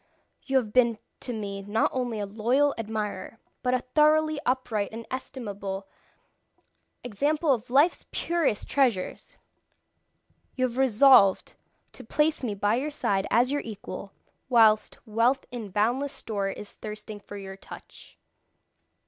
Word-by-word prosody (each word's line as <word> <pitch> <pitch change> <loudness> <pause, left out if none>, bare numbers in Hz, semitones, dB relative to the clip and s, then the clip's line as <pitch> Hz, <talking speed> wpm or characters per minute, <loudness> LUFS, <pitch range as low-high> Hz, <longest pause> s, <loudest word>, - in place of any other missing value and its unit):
You 270 -1 +2
have 220 -5 -1
been 235 -3 +4 0.2
to 250 - -5
me 200 -3 -4
not 205 +3 0
only 245 -4 -2
a 205 - -2
loyal 240 +8 +1
admirer, 215 -2 -4 0.2
but 250 0 +1
a 250 - -2
thoroughly 310 0 +4
upright 235 -5 0
and 225 +1 -7
estimable 200 -7 -5 1.2
example 290 +6 +1
of 235 -1 -4
life's 285 +7 +3
purest 335 -11 0
treasures. 245 -10 0 1.2
You 255 - +1
have 245 -1 -4
resolved 255 -5 +5 0.4
to - - -11
place 305 +1 +1
me 215 -5 -2
by 205 +3 +1
your 285 +4 -2
side 195 -9 -1
as 245 +3 +3
your 290 0 0
equal, 205 -2 -8 0.4
whilst 220 -3 +4
wealth 230 +5 +1
in 230 -4 -6
boundless 240 +8 0
store 200 -3 -3
is 200 +1 -8
thirsting 215 0 -8
for 205 0 -10
your 195 -1 -8
touch. 195 - -13
230 Hz, 135 wpm, -27 LUFS, 205-265 Hz, 1.2 s, resolved